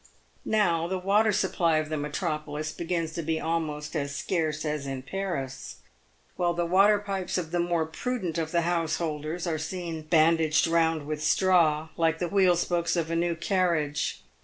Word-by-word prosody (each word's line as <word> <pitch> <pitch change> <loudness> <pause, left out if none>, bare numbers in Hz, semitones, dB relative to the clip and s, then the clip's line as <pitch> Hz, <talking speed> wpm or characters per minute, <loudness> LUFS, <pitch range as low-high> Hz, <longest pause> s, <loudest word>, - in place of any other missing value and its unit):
Now 170 -6 +2
the 190 +1 -2
water 205 +4 +3
supply 175 -5 +1
of 155 0 -1
the 155 - -2
metropolis 150 +1 -3
begins 165 -1 -3
to 170 - -3
be 160 0 -1
almost 155 -2 -3
as 140 -2 -2
scarce 155 -3 -1
as 150 -2 -2
in 135 -1 -4
Paris; 155 -6 -4 0.6
while 175 -1 +1
the 175 0 0
water 195 +4 +5
pipes 195 -3 -3
of 165 -3 -3
the 175 - 0
more 170 -2 +1
prudent 180 -1 -3
of 160 -1 -3
the 170 - +2
householders 165 -1 -2
are 160 -3 -1
seen 165 0 -4
bandaged 160 0 +3
round 165 -2 +1
with 155 0 -4
straw, 160 -5 +3
like 165 -1 +2
the 175 0 -2
wheel 185 -1 +4
spokes 175 0 0
of 165 -1 -1
a - - 0
new 170 0 +1
carriage. 165 -5 0
165 Hz, 170 wpm, -27 LUFS, 155-175 Hz, 0.6 s, water